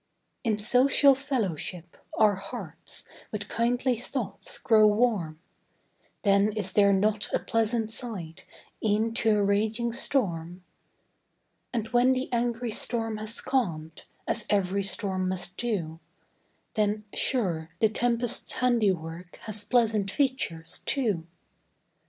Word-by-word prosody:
In 220 -4 +1
social 260 +6 +5
fellowship, 195 - -3 0.2
our 215 -1 +5
hearts 195 +1 -8 0.2
With 210 -1 -4
kindly 245 +1 0
thoughts 245 - -4
grow 215 -2 +5
warm; 210 -8 +1 0.9
Then 200 0 +3
is 200 -3 -2
there 200 -1 +5
not 205 +2 +1
a - - +3
pleasant 225 0 0
side, 195 -9 -5 0.4
E'en 220 +1 +1
to 225 -2 +2
a 205 - +2
raging 215 +4 +1
storm? 180 -9 -1 1.1
And 225 -3 -2
when 245 +2 +4
the 255 0 -3
angry 235 0 0
storm 225 0 0
has 215 +2 -4
calm'd, 170 - -2 0.2
As 230 - -2
ev'ry 200 -1 +1
storm 190 -1 -1
must 180 -1 -3
do, 175 -10 -2 0.7
Then, 210 0 0
sure, 175 -11 0
the 220 - +5
tempest's 235 +2 0
handiwork, 185 -8 0
Has 215 -1 -1
pleasant 215 -2 +2
features, 200 - -1
too. 210 - 0
215 Hz, 115 wpm, -27 LUFS, 190-235 Hz, 1.1 s, social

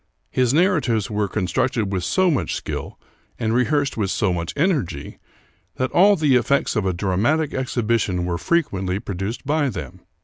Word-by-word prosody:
His 125 -2 +2
narratives 150 - +2
were 105 -1 0
con 95 - -2
structed 125 0 0
with 95 -2 -2
so 185 - +2
much 145 - -1
skill, - - -5 0.4
and 110 0 -1
rehearsed 140 +3 +1
with 100 -3 0
so 100 -2 +1
much 85 -1 -3
energy, 145 - -1 0.6
that 130 0 -1
all 200 +3 +6
the 150 -7 +3
effects 140 +2 +1
of 105 -4 0
a - - +2
dramatic 105 - 0
exhibition 115 -8 0
were 85 -1 -2
fre 170 - +3
quently 95 -2 -4
produced 100 +7 -4
by 145 0 +1
them. - - -7
120 Hz, 170 wpm, -22 LUFS, 95-145 Hz, 0.6 s, all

